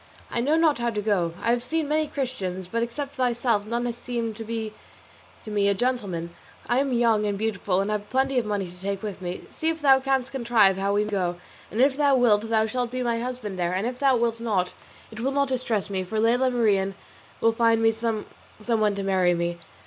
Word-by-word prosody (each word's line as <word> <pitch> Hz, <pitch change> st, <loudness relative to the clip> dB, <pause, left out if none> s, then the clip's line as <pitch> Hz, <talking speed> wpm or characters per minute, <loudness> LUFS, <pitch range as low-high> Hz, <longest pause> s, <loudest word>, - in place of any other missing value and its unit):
I 235 Hz, -, 0 dB
know 290 Hz, +6 st, +2 dB
not 320 Hz, -5 st, +3 dB
how 235 Hz, 0 st, 0 dB
to 215 Hz, -3 st, -3 dB
go. 195 Hz, -6 st, 0 dB
I 230 Hz, -, +2 dB
have 240 Hz, 0 st, +1 dB
seen 310 Hz, +5 st, -1 dB
many 305 Hz, +1 st, +1 dB
Christians, 200 Hz, -11 st, -3 dB
but 230 Hz, +5 st, -2 dB
except 275 Hz, +4 st, -4 dB
thyself 240 Hz, -4 st, +1 dB
none 235 Hz, +2 st, -1 dB
has 240 Hz, -1 st, -2 dB
seemed 235 Hz, -2 st, -4 dB
to 225 Hz, -, -5 dB
me 220 Hz, -1 st, -4 dB, 0.7 s
to 215 Hz, -, -6 dB
be 205 Hz, -1 st, +2 dB
a 200 Hz, -, +3 dB
gentleman. 195 Hz, -8 st, -2 dB, 0.4 s
I 245 Hz, +1 st, +2 dB
am 275 Hz, -1 st, 0 dB
young 230 Hz, -3 st, +3 dB
and 200 Hz, -1 st, -1 dB
beautiful, 200 Hz, -3 st, 0 dB
and 200 Hz, +2 st, -1 dB
have 210 Hz, -1 st, -3 dB
plenty 265 Hz, 0 st, +2 dB
of 235 Hz, -, -3 dB
money 205 Hz, -2 st, -1 dB
to 180 Hz, +1 st, -11 dB
take 195 Hz, +1 st, -3 dB
with 205 Hz, -2 st, -5 dB
me. 180 Hz, 0 st, -4 dB
See 320 Hz, -, -1 dB
if 325 Hz, 0 st, -2 dB
thou 270 Hz, -3 st, +6 dB
canst 265 Hz, -1 st, 0 dB
contrive 230 Hz, -7 st, +3 dB
how 200 Hz, +1 st, 0 dB
we 205 Hz, -, +3 dB
may 210 Hz, -, -5 dB
go, 180 Hz, -3 st, 0 dB, 0.3 s
and 215 Hz, -, -4 dB
if 265 Hz, +1 st, +4 dB
thou 285 Hz, -2 st, +4 dB
wilt 225 Hz, -3 st, +3 dB
thou 220 Hz, -1 st, +3 dB
shalt 245 Hz, +2 st, -2 dB
be 255 Hz, +1 st, -3 dB
my 235 Hz, -1 st, 0 dB
husband 240 Hz, -6 st, -5 dB
there, 175 Hz, 0 st, 0 dB
and 190 Hz, +4 st, -1 dB
if 250 Hz, +1 st, -3 dB
thou 270 Hz, -3 st, +4 dB
wilt 230 Hz, -1 st, 0 dB
not 200 Hz, -6 st, 0 dB, 0.4 s
it 220 Hz, -, -9 dB
will 260 Hz, +4 st, 0 dB
not 280 Hz, -1 st, +1 dB
distress 240 Hz, -5 st, -1 dB
me, 190 Hz, -1 st, -1 dB
for 215 Hz, +4 st, -3 dB
Lela 245 Hz, +4 st, +3 dB
Marien 200 Hz, -6 st, +1 dB, 0.4 s
will 225 Hz, 0 st, +3 dB
find 225 Hz, 0 st, +3 dB
me 225 Hz, -, +5 dB
some 225 Hz, -1 st, -2 dB, 0.3 s
one 215 Hz, -2 st, +1 dB
to 200 Hz, -, -3 dB
marry 185 Hz, -2 st, +2 dB
me. 170 Hz, 0 st, -2 dB
225 Hz, 235 wpm, -25 LUFS, 200-250 Hz, 0.7 s, thou